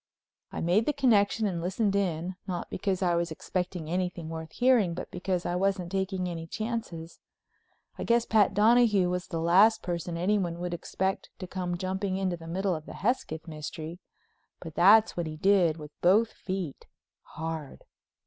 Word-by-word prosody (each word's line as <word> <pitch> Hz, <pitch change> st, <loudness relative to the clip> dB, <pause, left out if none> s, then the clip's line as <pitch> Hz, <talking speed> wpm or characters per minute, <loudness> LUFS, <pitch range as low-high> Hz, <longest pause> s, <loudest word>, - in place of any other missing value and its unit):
I -, -, -4 dB
made 185 Hz, +7 st, +2 dB
the 300 Hz, -, +2 dB
connection 225 Hz, -6 st, +3 dB
and 180 Hz, -5 st, -1 dB
listened 195 Hz, +3 st, 0 dB
in, 180 Hz, -2 st, -1 dB
not 180 Hz, -2 st, -4 dB
because 190 Hz, 0 st, -1 dB
I 175 Hz, -1 st, +2 dB
was 170 Hz, 0 st, 0 dB
expecting 180 Hz, 0 st, -4 dB
anything 180 Hz, -1 st, -2 dB
worth 160 Hz, 0 st, -6 dB
hearing, 240 Hz, -9 st, +3 dB
but -, -, -6 dB
because 180 Hz, 0 st, -2 dB
I 175 Hz, -, -1 dB
wasn't 185 Hz, -1 st, 0 dB
taking 190 Hz, -1 st, -1 dB
any 165 Hz, -2 st, -5 dB
chances. 210 Hz, -5 st, -5 dB, 0.8 s
I -, -, -2 dB
guess 235 Hz, 0 st, +2 dB
Pat 210 Hz, -3 st, +3 dB
Donahue 210 Hz, -4 st, +4 dB
was 180 Hz, 0 st, -3 dB
the 165 Hz, -, -3 dB
last 200 Hz, +7 st, +5 dB
person 170 Hz, -1 st, -3 dB
anyone 180 Hz, -1 st, 0 dB
would 175 Hz, 0 st, -4 dB
expect 190 Hz, +2 st, -2 dB
to 185 Hz, -, -6 dB
come 180 Hz, -1 st, -3 dB
jumping 190 Hz, +1 st, -2 dB
into 190 Hz, -2 st, -1 dB
the 165 Hz, -1 st, -11 dB
middle 190 Hz, +3 st, 0 dB
of 155 Hz, -2 st, -6 dB
the -, -, -8 dB
Hesketh 185 Hz, -8 st, -2 dB
mystery—but 160 Hz, +1 st, -10 dB
that's 210 Hz, +7 st, +6 dB
what 175 Hz, -2 st, -2 dB
he 155 Hz, 0 st, -6 dB
did, 180 Hz, -3 st, +3 dB
with 150 Hz, -1 st, -9 dB
both 210 Hz, +6 st, +4 dB
feet, 185 Hz, -6 st, -5 dB, 0.5 s
hard. 160 Hz, -3 st, -5 dB
180 Hz, 170 wpm, -28 LUFS, 170-200 Hz, 0.8 s, that's